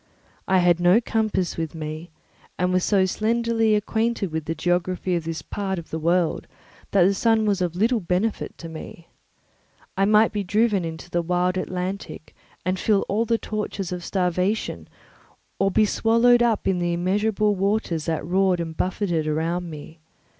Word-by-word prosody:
I 190 - +3
had 175 -1 +4
no 175 +5 +5
compass 220 -6 -1
with 160 -1 -4
me 155 +2 -6 0.5
and 180 +1 0
was 185 0 +2
so 195 -3 +3
slenderly 225 +2 +1
acquainted 220 -2 -1
with 160 -1 -3
the 165 - -3
geography 180 +2 -1
of 170 -2 -3
this 165 -1 -4
part 195 -2 -3
of 170 - -8
the 160 - -3
world 170 +1 +1 0.4
that 195 -3 +4
the 195 +3 +4
sun 225 +2 +2
was 200 -3 +1
of 175 -2 -1
little 225 +5 +2
benefit 190 +4 -2
to 165 - -8
me. 165 +1 -10 0.9
I 195 - +2
might 215 +2 +4
be 205 -1 -2
driven 205 0 +1
into 165 +1 -7
the 175 - +1
wide 180 +2 0
Atlantic 185 -2 -5 0.3
and 185 0 0
feel 210 -3 +2
all 215 +4 0
the 230 0 +1
tortures 210 -4 -4
of 180 -1 -4
starvation 180 - -1 0.7
or 195 - +3
be 215 +3 +3
swallowed 230 +3 +3
up 230 -3 +1
in 190 -2 +1
the 175 0 0
immeasurable 205 +4 +1
waters 195 -5 -1
that 160 -3 -2
roared 185 +1 +2
and 165 -1 -4
buffeted 175 -4 -1
around 165 +3 -1
me. 155 +1 -10
185 Hz, 170 wpm, -23 LUFS, 170-210 Hz, 0.9 s, no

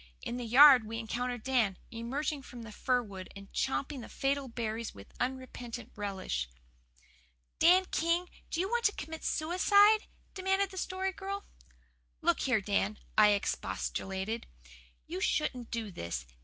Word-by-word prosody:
In 240 - -3
the 245 - -4
yard 255 -1 +8
we 225 +1 -4
encountered 240 +1 -3
Dan, 235 -8 +2
emerging 270 +6 -2
from 245 -2 -10
the 220 - -9
fir 250 +3 +1
wood 190 -4 -9
and 195 0 -12
champing 270 0 -1
the - - -9
fatal 275 0 -1
berries 230 -1 -4
with 100 0 -13
unrepentant 250 -2 -4
relish. 190 - -3 1.1
"Dan 365 +3 +6
King, 335 +2 +1 0.2
do 330 - -2
you 375 - +1
want 475 +2 0
to 410 - +4
commit 320 -1 -7
suicide?" 405 +6 +4 0.3
demanded 385 0 +1
the 380 - -9
Story 375 +1 -2
Girl. 395 +1 -5 0.7
"Look - - +2
here, 250 -6 +2
Dan," 205 +1 0 0.2
I 215 - +7
expostulated. 190 - -2 0.6
"You 185 - -5
shouldn't 250 -4 0
do 225 -3 -3
this. 85 - -4
245 Hz, 145 wpm, -32 LUFS, 215-320 Hz, 1.1 s, yard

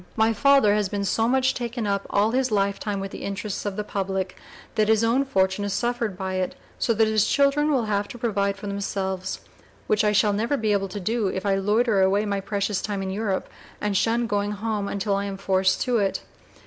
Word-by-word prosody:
My 225 0 +3
father 275 -3 +5
has 210 -2 +1
been 200 0 -2
so 225 +3 +1
much 260 +1 +2
taken 240 -2 -3
up 200 -1 -1
all 205 +2 +2
his 260 +1 +1
lifetime 200 -1 0
with 195 0 -5
the - - -8
interests 200 +1 -4
of 200 - -3
the 210 - -2
public, 190 -2 -3 0.4
that 215 -1 +2
his 220 0 +3
own 235 +4 +3
fortune 190 -5 +1
has 200 -1 -2
suffered 235 -3 -1
by 190 -1 -3
it: 185 -1 -2 0.2
so 235 - +1
that 220 +1 +4
his 215 -1 +2
children 285 +2 +3
will 260 -6 +2
have 205 -1 0
to 240 - -9
provide 200 -4 0
for 200 - -9
themselves, 190 -2 -3 0.4
which 215 0 +2
I 210 - +3
shall 210 0 +3
never 230 +7 0
be 220 -3 0
able 195 -1 +1
to 205 - -5
do 220 +2 0
if 190 +1 -3
I 200 - +2
loiter 210 +2 +2
away 195 +2 +3
my 200 -1 -1
precious 200 0 -1
time 200 -2 -3
in 190 - -3
Europe 200 -1 -2 0.3
and 205 -1 -1
shun 230 +4 +2
going 205 -1 -1
home 210 -1 -2
until 200 0 -1
I 200 0 -1
am 195 -1 -4
forced 190 -1 +1
to 245 -3 +1
it. 195 -2 -1
205 Hz, 225 wpm, -24 LUFS, 195-225 Hz, 0.4 s, father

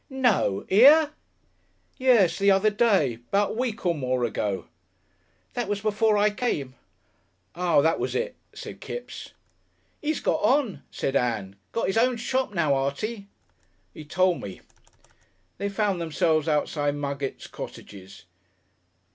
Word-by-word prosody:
"No! 255 - +1
Here?" 285 +9 +7 0.9
"Yes. 240 -10 +4
The 200 0 +4
other 195 +2 +4
day. 195 - +2
'Bout 200 +1 +2
a - - -4
week 235 -3 -3
or 175 - +3
more 130 -4 -1
ago." 105 -4 -2 0.9
"That 240 -3 -2
was 205 0 -1
before 215 +1 +2
I 210 +1 +3
came." 155 - -2 0.8
"Ah! 170 -3 +2
that 160 +2 +2
was - - -2
it," 485 +2 -2 0.2
said - - -9
Kipps. 485 - -8 0.7
"'E's 310 0 -1
got 310 - 0
on," 260 - +1
said 135 - -3
Ann. 110 -7 -1 0.2
"Got 230 - -1
'is 195 +4 +1
own 250 +1 +2
shop 255 +1 -1
now, 165 -7 +1
Artie." 195 +11 -2 0.7
"'E 155 - -9
tole 180 +3 +1
me." 95 - -8 1.0
They 200 - -1
found 200 -3 -1
themselves 160 -1 +1
outside 145 -1 0
Muggett's 140 -1 -4
cottages. 95 -2 -10
190 Hz, 135 wpm, -25 LUFS, 145-230 Hz, 1.0 s, Here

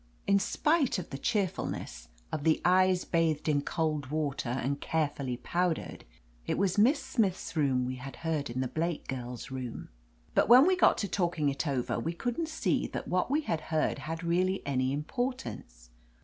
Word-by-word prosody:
In 200 0 +4
spite 295 - +1
of 180 - -6
the 135 - -4
cheerful 205 -3 0
ness, - - -6 0.2
of 155 - -3
the 160 0 +3
eyes 185 0 +4
bathed 165 -3 +1
in 145 -2 +2
cold 155 -2 -1
water 145 -3 -2
and 135 +3 -2
care 160 -2 +1
fully 130 -4 -4
powdered, 175 +4 -2 0.4
it - - 0
was 195 0 +1
Miss 265 +8 +5
Smith's 200 -6 0
voice 145 -5 +1
we 130 +1 -3
had 135 +2 -8
heard 155 -4 -1
in 125 +2 -2
the 130 - 0
Blake 165 +4 -2
girl's 125 -1 -5
room. 130 -3 -6 0.4
But - - +3
when 250 +4 +9
we 375 +1 +4
got 365 - +4
to 200 - -1
talking 170 -6 0
it 135 -1 -2
over 130 -4 -1
we 165 - -2
couldn't 245 - -2
see 320 - 0
that - - -5
what 180 +4 +1
we 295 +3 +2
had 165 - -2
heard 155 -2 +1
had 165 +5 -5
really 185 +3 +1
any 130 -2 0
importance. 150 - -4
160 Hz, 185 wpm, -30 LUFS, 135-190 Hz, 0.4 s, when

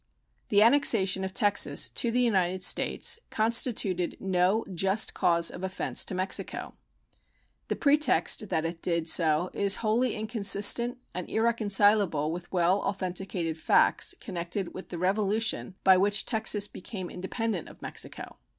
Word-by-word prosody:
The 205 0 +4
annexation 225 -7 +3
of 190 - -4
Texas 205 0 +2
to 235 - +1
the 245 +2 0
United 185 -6 0
States 460 - +2
constituted 215 -5 0
no 190 +3 0
just 195 +4 0
cause 170 -1 +1
of - - -10
offense 190 0 -2
to 185 - -6
Mexico. 185 +1 -3 0.9
The - - -2
pretext 290 -7 +1
that 160 0 -1
it 165 0 -5
did 170 -2 -1
so 165 +1 +3
is 200 -1 +2
wholly 235 +3 +1
inconsistent 220 +2 +3 0.2
and 180 -1 -6
irreconcilable 205 -8 +1
with 175 +1 -8
well 180 +2 +1
authenticated 185 -4 -4
facts 380 - +2
connected 180 -1 -5
with 185 - -10
the 175 - -6
revolution 205 +2 -1
by 190 -1 +5
which 205 +2 +1
Texas 220 -2 0
became 185 -2 -8
independent 190 0 -4
of - - -16
Mexico. - - -6
195 Hz, 135 wpm, -27 LUFS, 180-220 Hz, 0.9 s, by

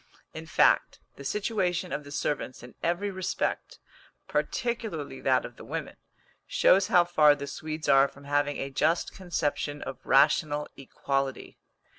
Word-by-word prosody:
In 160 0 -8
fact, - - +3 0.2
the 140 - -10
situation 185 - -1
of 150 - -3
the 145 - -12
servants 145 -3 -3
in 125 - -11
every 175 +4 -1
respect, 185 -1 -3 0.5
particularly 225 - -3
that - - +2
of - - -10
the - - -11
women, - - -5 0.5
shows 190 0 +4
how 180 -5 +5
far 155 -4 +5
the 140 -1 -6
Swedes 155 +2 -6
are 135 0 +6
from 140 +1 -16
having 145 0 0
a 135 - -4
just 155 +5 +1
conception 150 -5 -2
of - - -8
rational 150 +2 +3
equality. 135 0 -3
150 Hz, 145 wpm, -28 LUFS, 140-175 Hz, 0.5 s, are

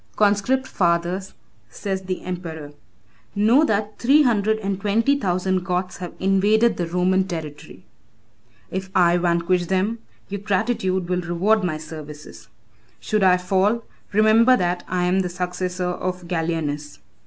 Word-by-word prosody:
"Conscript 210 +6 +2
fathers," 175 -1 -1 0.3
says 190 - -4
the 185 -1 -4
emperor, 165 -5 -6 0.6
"know 225 +8 +4
that 210 -5 -1
three 280 +5 +5
hundred 220 -3 +2
and 195 -2 -3
twenty 230 +7 +2
thousand 185 -1 0
Goths 180 0 -2
have 180 -2 -7
invaded 205 +4 +3
the 175 - -2
Roman 185 +2 +1
territory. 160 -5 -8 0.9
If 190 0 -4
I 175 -1 +4
vanquish 175 0 +1
them, 190 +5 0 0.3
your 200 0 -5
gratitude 190 -3 0
will 180 0 -1
reward 185 +5 +1
my 165 -4 -1
services. 150 -7 -10 0.5
Should 210 - -1
I 185 -1 +5
fall, 195 +5 +1 0.3
remember 220 +4 +5
that 175 0 -1
I 180 -1 -1
am 180 +2 +2
the 180 -1 -1
successor 180 0 -3
of 180 0 -4
Gallienus. 160 -4 -3
185 Hz, 135 wpm, -22 LUFS, 175-205 Hz, 0.9 s, three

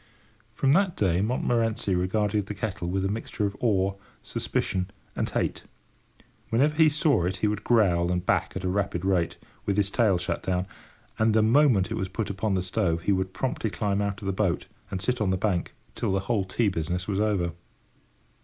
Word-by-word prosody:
From 135 - +1
that 185 +3 +3
day 90 -3 +2
Montmorency 115 -2 0
regarded 100 +3 0
the 105 - -5
kettle 95 -6 -3
with 95 +1 0
a - - +2
mixture 105 +1 -2
of 100 0 -2
awe, 100 -4 +2 0.3
suspicion, 90 0 -2 0.3
and - - -1
hate. - - -2 0.8
Whenever 140 +7 +3
he 155 0 +5
saw 145 - +2
it 95 +1 -1
he 95 +3 0
would 105 0 -2
growl 90 -7 +3
and 90 -1 -1
back - - +1
at 95 - -4
a - - 0
rapid 95 -2 -1
rate, 90 -4 +1 0.3
with 100 -1 +1
his 100 -1 +2
tail 105 -6 +3
shut 85 0 -2
down, 90 0 -1 0.5
and 110 0 +3
the 110 - +5
moment 115 -5 +4
it - - -1
was 95 - -1
put 100 +2 -3
upon 100 +1 -1
the 90 - 0
stove 85 -2 0
he 100 - +1
would 95 -1 0
promptly 120 +1 -2
climb 100 -1 -1
out 100 0 -3
of - - -5
the 95 - 0
boat, 95 -3 0 0.2
and 95 -1 -3
sit 125 +1 0
on 100 - +2
the 95 - +1
bank, 95 -3 -1 0.2
till - - -1
the 95 0 +1
whole 100 -1 0
tea 110 +4 0
business 90 +1 -2
was 100 -1 -1
over. 100 -5 +1
100 Hz, 200 wpm, -27 LUFS, 95-110 Hz, 0.8 s, he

